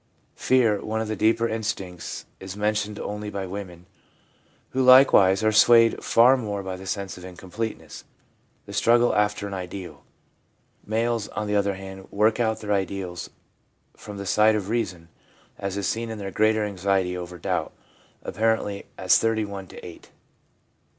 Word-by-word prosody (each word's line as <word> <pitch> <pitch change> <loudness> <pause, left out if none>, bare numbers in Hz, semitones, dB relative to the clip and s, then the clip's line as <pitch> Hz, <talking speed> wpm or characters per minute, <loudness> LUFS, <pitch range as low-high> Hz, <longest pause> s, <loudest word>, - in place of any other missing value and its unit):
Fear, 115 -6 +2
one 110 +1 -2
of 110 - -2
the 110 - -2
deeper 115 +3 +2
instincts, 105 -6 -4
is 95 +1 -8
men 105 +1 +1
tioned 105 0 -3
only 105 0 -5
by 100 -2 -4
women, 90 -2 -8 0.9
who 130 - 0
likewise 125 -7 +6
are 110 - +3
swayed 115 +1 +5
far 120 +3 +5
more 105 -5 -4
by 95 -1 -4
the 95 +1 -10
sense 100 -1 -4
of - - -13
incompleteness, 95 +5 -7 0.6
the - - -10
struggle 120 +1 +3
after 105 0 +1
an 100 - -7
ideal. 95 0 -7 0.8
Males, 115 0 0
on 110 - -4
the 105 0 -1
other 100 -1 +1
hand, 95 0 -10
work 110 +3 +2
out 110 -2 0
their 105 -1 -1
ideals 95 -2 -3 0.7
from 105 -1 -10
the 100 - -6
side 105 +3 +4
of 100 -2 -3
reason, 90 -8 -3 0.5
as 100 0 -3
is 100 - -1
seen 115 0 -2
in 110 - -5
their 100 -1 -6
greater 110 +1 +2
anxiety 95 -2 0
over 90 0 -7
doubt - - -2 0.3
— - - -33
apparently 110 -3 -1
as 95 -1 +4
31 105 -4 -2
to - - -11
8. 85 - -12
105 Hz, 165 wpm, -24 LUFS, 95-110 Hz, 0.9 s, likewise